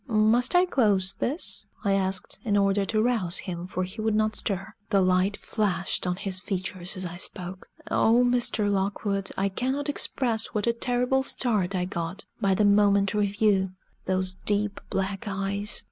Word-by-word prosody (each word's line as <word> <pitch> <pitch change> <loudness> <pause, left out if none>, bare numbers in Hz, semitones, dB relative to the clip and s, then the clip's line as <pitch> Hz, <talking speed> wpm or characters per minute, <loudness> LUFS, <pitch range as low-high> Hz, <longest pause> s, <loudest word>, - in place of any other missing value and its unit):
"Must 230 +4 +3
I 355 +1 +6
close 205 - +2
this?" 290 +8 -2 0.2
I 200 - +3
asked, 190 -1 -1
in 210 -4 +1
order 200 0 +2
to 215 +2 +1
rouse 220 -8 +1
him, 175 -1 -4
for 185 0 -2
he 185 +4 -6
would 220 -1 +1
not 215 0 +1
stir. 195 -2 0 0.2
The 200 -3 +3
light 185 +2 +2
flashed 190 -4 -1
on 180 - 0
his 185 0 -4
features 185 -1 -4
as 185 - -3
I 175 0 -6
spoke. 185 0 -6 0.2
O 235 +2 +4
Mr. 240 -4 +2
Lockwood, 200 0 -1
I 195 - +1
cannot 260 +8 -2
express 235 -5 0
what 210 - +1
a 235 - +2
terrible 250 +2 +1
start 210 -8 0
I 180 -1 0
got 180 +1 -5 0.2
by 195 -1 +3
the 210 - +3
momentary 200 0 +3
view! 195 -2 +1 0.3
Those 185 0 0
deep 205 +1 -1
black 195 +3 -2
eyes! 200 +1 -1
200 Hz, 170 wpm, -26 LUFS, 190-220 Hz, 0.3 s, I